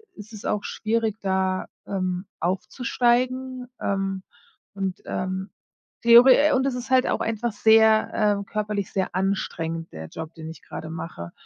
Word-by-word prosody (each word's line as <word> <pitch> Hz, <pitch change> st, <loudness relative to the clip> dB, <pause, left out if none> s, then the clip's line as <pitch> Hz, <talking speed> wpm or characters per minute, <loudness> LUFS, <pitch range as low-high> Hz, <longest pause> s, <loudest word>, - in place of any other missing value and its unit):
ist 215 Hz, +2 st, -12 dB
es 210 Hz, -, -9 dB
auch 210 Hz, -, -1 dB
schwierig, 220 Hz, -1 st, -1 dB
da, 190 Hz, -1 st, 0 dB, 0.2 s
ähm, 185 Hz, -1 st, -2 dB
aufzusteigen. 250 Hz, +7 st, 0 dB
Ähm, 195 Hz, -1 st, -2 dB, 0.5 s
und 195 Hz, -2 st, -3 dB
ähm, 185 Hz, +1 st, -3 dB, 0.5 s
theore 250 Hz, +5 st, +7 dB
und 260 Hz, +1 st, +2 dB
es 270 Hz, -, 0 dB
ist 250 Hz, +1 st, -6 dB
halt 260 Hz, 0 st, +4 dB
auch -, -, 0 dB
einfach 225 Hz, +1 st, -1 dB
sehr 220 Hz, -1 st, +4 dB
äh, -, -, -26 dB
körperlich 210 Hz, -2 st, -2 dB
sehr 190 Hz, -2 st, -2 dB
anstrengend, 165 Hz, -4 st, -2 dB
der 80 Hz, 0 st, -8 dB
Job, 160 Hz, -, -8 dB
den 160 Hz, 0 st, -8 dB
ich 160 Hz, -, -12 dB
grade 160 Hz, -, -8 dB
mache. 160 Hz, -, -7 dB
200 Hz, 145 wpm, -24 LUFS, 185-235 Hz, 0.5 s, theore